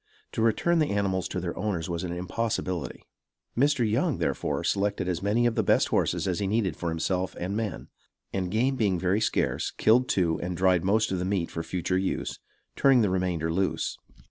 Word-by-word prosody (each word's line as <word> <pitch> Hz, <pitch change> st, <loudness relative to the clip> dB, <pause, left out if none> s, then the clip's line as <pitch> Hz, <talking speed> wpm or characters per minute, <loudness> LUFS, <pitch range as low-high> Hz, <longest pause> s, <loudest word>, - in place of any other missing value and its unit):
To -, -, -2 dB
return 165 Hz, +10 st, +2 dB
the 155 Hz, -, +2 dB
animals 95 Hz, -3 st, 0 dB
to 90 Hz, -, -3 dB
their 85 Hz, -1 st, -4 dB
owners 95 Hz, -5 st, -2 dB
was 85 Hz, 0 st, -3 dB
an 90 Hz, -, -3 dB
impossibility; 90 Hz, -, -3 dB, 0.5 s
Mr. 135 Hz, -2 st, +3 dB
Young, 130 Hz, +8 st, +1 dB
therefore, -, -, -1 dB
selected 100 Hz, -2 st, 0 dB
as 90 Hz, -2 st, -1 dB
many 105 Hz, +4 st, +2 dB
of 120 Hz, -, +2 dB
the -, -, +1 dB
best -, -, +3 dB
horses -, -, +1 dB
as 90 Hz, -2 st, 0 dB
he 100 Hz, -, -1 dB
needed 100 Hz, -5 st, 0 dB
for 85 Hz, -, -3 dB
himself 90 Hz, +3 st, -1 dB
and 95 Hz, +3 st, -3 dB
men, 110 Hz, -5 st, -3 dB, 0.5 s
and 95 Hz, -2 st, -1 dB
game 125 Hz, +7 st, +1 dB
being 100 Hz, -7 st, +1 dB
very 95 Hz, +4 st, +1 dB
scarce, -, -, 0 dB
killed 125 Hz, +4 st, +3 dB
two 85 Hz, -4 st, +1 dB
and 90 Hz, 0 st, -3 dB
dried 90 Hz, -1 st, +3 dB
most 110 Hz, +3 st, +2 dB
of 95 Hz, -, -1 dB
the -, -, -1 dB
meat 95 Hz, -3 st, -1 dB
for 85 Hz, -, -3 dB
future 90 Hz, +2 st, -1 dB
use, 95 Hz, -, -2 dB, 0.4 s
turning 135 Hz, -3 st, +5 dB
the 100 Hz, -4 st, +2 dB
remainder 90 Hz, -3 st, 0 dB
loose. 95 Hz, +2 st, -1 dB
95 Hz, 195 wpm, -27 LUFS, 90-110 Hz, 0.5 s, turning